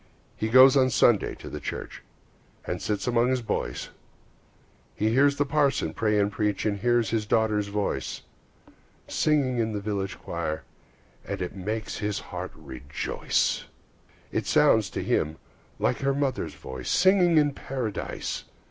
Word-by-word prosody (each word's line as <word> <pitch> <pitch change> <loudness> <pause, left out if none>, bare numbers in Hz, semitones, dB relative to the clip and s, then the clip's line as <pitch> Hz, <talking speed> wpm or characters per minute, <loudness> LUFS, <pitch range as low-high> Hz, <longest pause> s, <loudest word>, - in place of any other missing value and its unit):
He 110 - -2
goes 130 +3 +8
on 130 -2 +4
Sunday 120 -3 +3
to - - -11
the - - -6
church, - - -6 0.6
And - - -3
sits 105 -2 -2
among 120 0 +2
his 130 -1 0
boys; - - -3 1.1
He 110 - +1
hears 140 +4 +4
the 145 - +1
parson 140 - +1
pray 105 -1 +1
and 100 0 +2
preach, 105 -1 -1
He 105 - +2
hears 115 +1 +1
his 110 -2 -1
daughter's 110 -2 +2
voice, 100 0 -3 0.8
Singing 140 -5 +1
in 110 -1 0
the 105 - -2
village 100 -2 -3
choir, 85 -2 -4 0.6
And - - -5
it 90 +1 -4
makes 105 +3 -4
his 105 -1 -1 0.2
heart 90 +1 -4
rejoice. 70 -2 -2 0.7
It - - -2
sounds - - +4
to - - -4
him 80 +1 0 0.4
like - - 0
her 140 0 +1
mother's 140 -2 -1
voice, 65 -1 -7
Singing 180 -2 +4
in 145 -2 +4
Paradise! 125 -7 -4
110 Hz, 150 wpm, -26 LUFS, 100-130 Hz, 1.1 s, goes